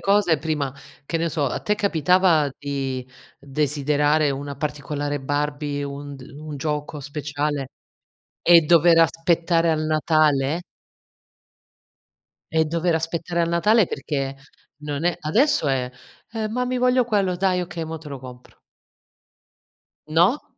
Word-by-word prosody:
cose 195 -5 +3
prima, 150 -4 -2 0.3
che 165 - -2
ne 165 0 0
so, 150 -2 -1
a - - -3
te 210 - 0
capitava 175 -4 +3
di 135 -3 -3 0.3
desiderare 145 +1 +1
una 140 +1 -5
particolare 145 -1 -3
Barbie, 145 +1 -2
un 140 0 -7
d 135 - -13 0.2
un 150 -1 -7
gioco 150 +1 -3
speciale 145 -1 -3 0.7
e 170 -1 +7
dover 165 +1 +5
aspettare 165 0 +2
al 155 -1 0
Natale? 155 -1 +2 1.9
E 160 0 +3
dover 170 +2 0
aspettare 165 +1 -2
al 165 - +1
Natale 205 +4 +3
perché 135 -1 -3 0.5
non 145 +1 -4
è 175 -2 +1
adesso 220 - +2
eh: 125 -2 0 0.6
"Mami 250 +3 -1
voglio 250 0 +3
quello". 200 -5 +1
"Dai 185 0 +1
okay 175 -1 -5
mo 160 0 -6
te 155 -1 -11
lo 140 -2 -6
compro". 125 -1 -13 1.5
No? 175 - +2
155 Hz, 125 wpm, -23 LUFS, 145-170 Hz, 1.9 s, e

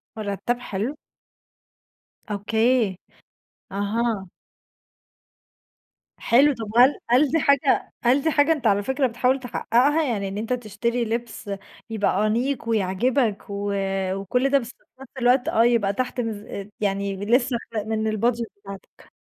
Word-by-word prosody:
مُرتَّب، 215 +3 -2
حلو. 235 +5 -4 1.3
أوكي. 220 0 +1 0.8
أها. 205 0 -1 1.9
حلو، 275 +5 +4
طَب 225 -3 -6
هل 255 +4 +7
هل 265 +4 +4
دي 325 - +2
حاجة 280 -1 +2
هل 255 +4 +4
دي 320 +2 +1
حاجة 290 +2 +3
أنت 285 -8 +1
على 205 0 +2
فكرة 265 +3 +1
بتحاول 250 +3 +1
تحقّقها، 260 +5 +1
يعني 215 -8 -1
إن 195 +1 -5
أنت 225 +4 -2
تشتري 235 +1 -2
لِبس 230 -1 -4 0.4
يبقى 210 -1 +1
أنيق 235 +2 -1
ويعجِبك 220 +2 +1
و 200 0 -3 0.4
وكلّ 225 +8 0
ده 280 - +4
بس 235 - -8
في - - -18 0.2
نفس 270 - -12
الوقت، 245 +1 +3
آه 225 - +3
يبقى 225 -5 +2
تحت 250 +2 -2
ميز 210 -3 -6
يعني 200 -1 -1
لسه 245 +2 +2 0.3
من 220 0 -1
الbudget 235 +1 +1 0.2
بتاعتك؟ 195 -1 -12
230 Hz, 130 wpm, -23 LUFS, 205-255 Hz, 1.9 s, هل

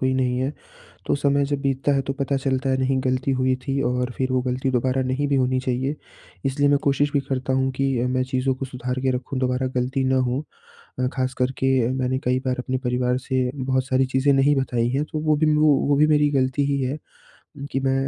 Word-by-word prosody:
कोई 130 0 +1
नहीं 125 -1 0
है। 130 +3 -1 0.5
तो - - +2
समय 140 0 +2
जब 140 0 -2
बीतता 135 +1 +1
है, 135 - +1
तो 135 - -3
पता 140 0 0
चलता 135 0 -1
है, 130 - +2
नहीं, 130 0 +1
ग़लती 130 +1 0
हुई 130 0 +2
थी, 135 0 0
और 125 0 -1
फिर 130 0 0
वो 130 - +2
ग़लती 130 +1 -1
दोबारा 130 +1 +1
नहीं 130 +3 -1
भी 140 - +1
होनी 130 0 +1
चाहिए, 130 +3 -2 0.5
इसलिए 140 +1 +1
मैं 145 - +4
कोशिश 145 +1 +1
भी 140 - +2
करता 130 0 -1
हूँ 130 0 +1
कि 135 0 0
अ, 125 - 0
मैं 130 0 +1
चीज़ों 130 +1 +1
को 130 - -5
सुधार 125 0 -4
के 135 - +2
रखूँ, 130 +1 -5
दोबारा 130 0 0
ग़लती 130 +2 0
ना 130 0 +2
हो 135 +5 -2 0.6
अ, 125 - +2
ख़ास 130 0 -1
कर 125 0 +1
के 135 - +1 0.2
अ, - - -2
मैंने 130 0 -1
कई 125 +1 +2
बार 130 0 0
अपने 130 +1 -2
परिवार 125 0 0
से 130 -1 -1
बहुत 130 -1 0
सारी 130 0 +2
चीज़ें 130 +2 +2
नहीं 140 +1 +3
बताई 120 -3 0
हैं, 140 +4 0
तो 155 - -2
वो 155 -1 +2
भी 155 +1 +2
ना 150 0 +3
वो, 145 -1 +3
भी 150 +2 +5
मेरी 150 -1 +3
ग़लती 135 0 +1
ही 140 -1 0
है 130 +4 -2 0.7
कि - - +1
मैं 135 0 +1
130 Hz, 240 wpm, -23 LUFS, 130-140 Hz, 0.7 s, भी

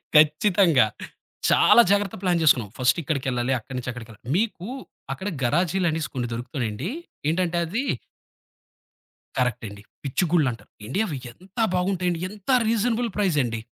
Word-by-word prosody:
ఖచ్చితంగా. 155 - +5 0.6
చాలా 235 - +7
జాగ్రత్తగా 200 -2 +1
ప్లాన్ 175 -3 +2
జేసుకున్నాం. 125 -9 +4
ఫస్టిక్కడికెళ్ళాలి, 130 -2 0
అక్కడి 130 +3 -8
నుంచి 125 0 -4
అక్కడికెళ్ళాలి. 115 0 -10
మీకు 205 -3 -1 0.5
అక్కడ 190 +9 -4
గరాజీలు 175 +7 +1
అనేసి 160 0 -2
కొన్ని 120 -2 -2
దొరుకుతన్నాయండి. 120 - -3 0.4
ఏంటంటే 175 +1 +1
అవి 225 +11 -2 1.5
కరెక్ట్ 125 -2 0
అండి. 100 0 -10 0.2
పిచ్చిగుుళ్ళు 155 +2 +1
అంటారు. 115 - -12 0.2
ఎండి 135 - -2
అవి 150 -8 -4
ఎంత 185 - -21 0.2
బాగుంటాయండి, 180 -2 0
ఎంత 205 +3 -12 0.2
రీజనబుల్ 230 +1 +1
ప్రైజ్ 185 -7 +2
అండి. 115 -1 -3
160 Hz, 125 wpm, -24 LUFS, 125-190 Hz, 1.5 s, చాలా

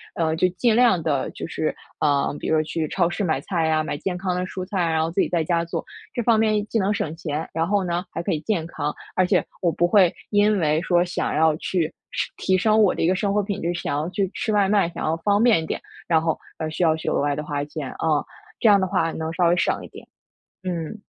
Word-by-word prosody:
呃， 160 -1 0
就 180 +3 +3
尽 215 +5 +1
量 235 -8 +4
地 145 -4 0
就 - - -6
是， - - -2 0.3
呃， 145 -1 +1
比 - - -5
如 160 - +2
说 155 - +2
去 155 0 -2
超 175 -3 +1
市 200 - -3
买 160 - +1
菜 170 -4 -1
呀， 155 0 +2
买 145 -2 -3
健 185 +2 -3
康 180 -1 -2
的 180 0 -1
蔬 185 0 -5
菜， 195 +1 -4
然 160 0 +1
后 160 - 0
自 190 - +1
己 - - +1
在 170 -2 +1
家 170 +1 0
做。 170 - -4 0.3
这 240 - -1
方 225 -1 +4
面 215 -1 +2
既 225 - -1
能 200 +1 +1
省 160 -6 -3
钱， 160 -2 -4
然 165 +1 0
后 200 -1 +1
呢 175 +1 -2
还 165 - -3
可 - - -2
以 155 - -1
健 175 -4 -1
康， 150 -3 -3 0.2
而 185 - +3
且 180 - +2 0.2
我 170 - +3
不 175 +2 +1
会 185 -2 +5 0.2
因 205 -1 +3
为 155 -1 +2
说 175 -1 +3
想 180 - -2
要 160 0 +4
去 175 0 -1 0.3
升 - - -2
提 190 - +1
升 215 +3 +3
我 205 - +4
的 - - -4
一 - - +3
个 185 - +3
生 200 +1 0
活 210 - +2
品 200 0 -3
质， 175 +1 0
想 145 -4 -2
要 155 - -1
去 195 0 -1
吃 220 - -1
外 200 -2 +3
卖， 200 -4 +3
想 - - -6
要 160 +1 0
方 205 +5 +2
便 225 -9 +4
一 - - -5
点， - - -4 0.3
然 160 -2 +3
后 160 -1 0 0.2
而 155 - -2
需 160 +3 -2
要 160 -1 +4
去 160 - -3
额 - - +1
外 145 0 +1
地 150 - -3
花 145 -1 -2
钱， 150 -2 -6
啊。 155 -2 +1 0.4
这 - - +3
样 200 -1 +6
的 190 - +2
话 165 -2 0
能 160 0 -4
稍 175 0 +2
微 175 - +3
省 - - +1
一 - - -8
点。 - - -13 0.6
嗯。 180 +3 -4
175 Hz, 290 characters per minute, -23 LUFS, 160-195 Hz, 0.6 s, 样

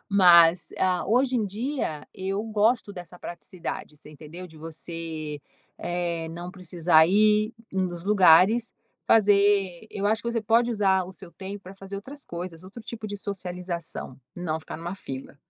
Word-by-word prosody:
Mas, 175 -3 +6
ah, 185 -1 +1
hoje 250 +3 +2
em 220 -3 +1
dia, 215 - -3
eu 195 +2 -3
gosto 220 0 +1
dessa 180 -1 -9
praticidade, 170 -3 -7
você 150 - -11
entendeu? 155 +4 -10
De 160 -2 -16
você, 160 -2 -6 0.4
eh, 170 -2 -2
não 175 +2 -7
precisar 175 -3 +3
ir 215 +3 +3 0.2
nos 180 -2 -2
lugares 200 +3 +5 0.3
fazer 200 -3 +4
eu 200 0 -2
acho 220 +1 +1
que 235 - -2
você 230 -1 0
pode 230 +3 +3
usar 195 -4 +2
o 185 - -10
seu 180 -1 -12
tempo 195 +1 -8
pra 185 +2 -10
fazer 195 0 -8
outras 275 +8 -10
coisas, 170 0 -7
outro 195 +5 -11
tipo 220 -1 -7
de 205 - -4
socialização, 180 -7 -5 0.2
não 160 -3 -2
ficar - - -8
numa 170 +3 -5
fila. 135 -7 -8
185 Hz, 160 wpm, -26 LUFS, 170-210 Hz, 0.4 s, Mas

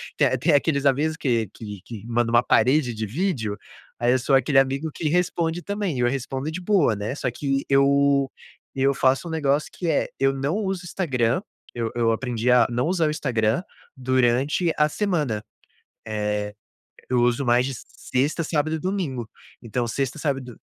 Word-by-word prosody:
tem - - +3
tem 160 +5 +2
aqueles 145 -1 +2
avisos 150 +4 +2
que 115 -7 0
que 105 -4 -8
que 110 -2 -9
manda 120 0 0
uma 120 0 +5
parede 130 +1 +3
de 110 0 -3
vídeo, 115 - -2 0.4
aí 120 +1 +3
eu 130 - +2
sou 135 +2 -1
aquele 135 +1 +3
amigo 135 +4 0
que 155 - -2
responde 170 0 0
também, 200 -6 -3
e - - -3
eu 120 - +3
respondo 135 +2 -3
de 165 +3 -5
boa, 180 - +3
né. 105 +5 -4
Só 130 - -2
que 135 +2 -2
eu 140 0 +3 0.4
eu 135 +1 +2
faço 135 +4 +2
um - - -5
negócio 145 -2 0
que 175 - -4
é - - +1
eu 135 0 +2
não 135 +5 -1
uso 195 -4 -2
o - - -10
Instagram, 130 -7 0 0.3
eu 115 -2 -2
eu 115 -1 +2
aprendi 120 0 -2
a 125 -1 +6
não 120 +1 0
usar 170 -3 +1
o - - 0
Instagram 115 -4 0 0.4
durante 130 +6 +2
a 150 - +4
semana, 150 - -1 0.6
eh, 105 -1 -2 0.6
eu 125 -1 +2
uso 120 +3 +2
mais 120 +1 +3
de 135 - -3
sexta, 135 +6 -2
sábado 155 0 0
e - - -4
domingo, 155 - -3 0.3
então 120 +1 -2
sexta, 135 +5 -2
sábado, 135 -5 -2
do - - -25
135 Hz, 185 wpm, -24 LUFS, 120-155 Hz, 0.6 s, a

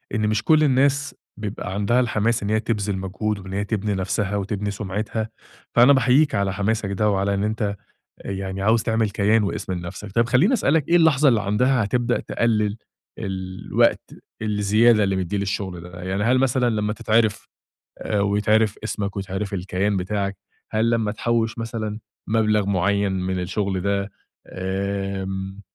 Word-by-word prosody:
إن 105 0 +1
مش 110 0 0
كل 155 -1 +4
الناس 140 +1 +2 0.2
بيبقى 100 -2 -5
عندها 105 +5 +2
الحماس 115 -2 +1
إن 100 - -2
هي 110 - +2
تبذِل 105 -3 -2
مجهود 100 +2 -3
وإن 95 0 -9
هي 100 +1 -1
تبني 105 -1 -1
نفسها 100 +2 -1
وتبني 100 +1 -2
سمعتها، 105 +2 -3 0.5
فأنا 125 +4 +7
باحيّيك 135 +3 +3
على 100 -1 0
حماسك 100 0 -1
ده 105 +2 +1
وعلى 100 0 +1
إن 100 +1 0
أنت 105 -1 -1 0.5
يعني 95 0 -4
عاوز 110 +2 +3
تعمل 110 -2 0
كيان 105 +2 +2
واسم 100 -1 -3
لنفسك. 90 +3 -6
طيّب 115 +1 +2
خلّيني 145 - +4
أسألك 160 - +2
إيه 170 - +5
اللحظة 155 -4 +5
اللي 115 -5 +3
عندها 125 +4 +2
هتبدأ 120 +4 0
تقلّل 110 -3 0 0.4
الوقت 95 -1 -1 0.3
الزيادة 105 +1 +3
اللي 95 -1 0
مدّيه 95 +2 -2
للشغل 95 -2 -3
ده؟ 90 0 -10
يعني 95 +3 -1
هل 125 +2 +3
مثلًا 130 -2 +2
لمّا 105 -1 -1
تتعرف 110 -1 +1 0.5
آآ 105 - -2
ويتعرف 105 +1 +2
اسمك 105 -2 -3
ويتعرف 95 +1 -4
الكيان 95 +2 -1
بتاعك؟ 100 +1 -2 0.3
هل 110 +2 +2
لمّا 115 -3 +1
تحوّش 115 0 -1
مثلًا 110 -2 -4 0.3
مبلغ 110 -2 +2
معيّن 100 +1 +1
من 95 0 -2
الشغل 95 +1 -2
ده؟ 100 0 -1 0.4
امم 95 0 -3
105 Hz, 155 wpm, -23 LUFS, 100-115 Hz, 0.5 s, فأنا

